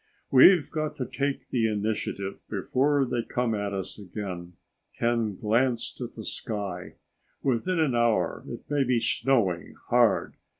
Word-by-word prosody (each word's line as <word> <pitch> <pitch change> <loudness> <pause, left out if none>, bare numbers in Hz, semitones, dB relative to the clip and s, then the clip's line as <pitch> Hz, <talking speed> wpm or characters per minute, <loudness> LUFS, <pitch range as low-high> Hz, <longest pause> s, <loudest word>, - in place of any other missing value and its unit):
"We've 150 +5 +7
got 155 -1 -2
to 130 - -3
take 140 +1 -3
the 115 -3 +2
initiative 105 -2 -2
before 140 +1 +1
they 120 -1 -1
come 120 0 -1
at 100 -1 -2
us 95 +1 -5
again." 90 -3 -6 0.4
Ken 115 -3 0
glanced 115 +4 0
at - - -5
the - - -8
sky. 100 -5 -5 0.5
"Within 140 +8 +1
an 155 -5 +2
hour 115 -8 +1
it - - -8
may 145 -1 +2
be 125 -2 +2
snowing 110 -9 +1
hard. - - +3
115 Hz, 140 wpm, -27 LUFS, 100-135 Hz, 0.5 s, We've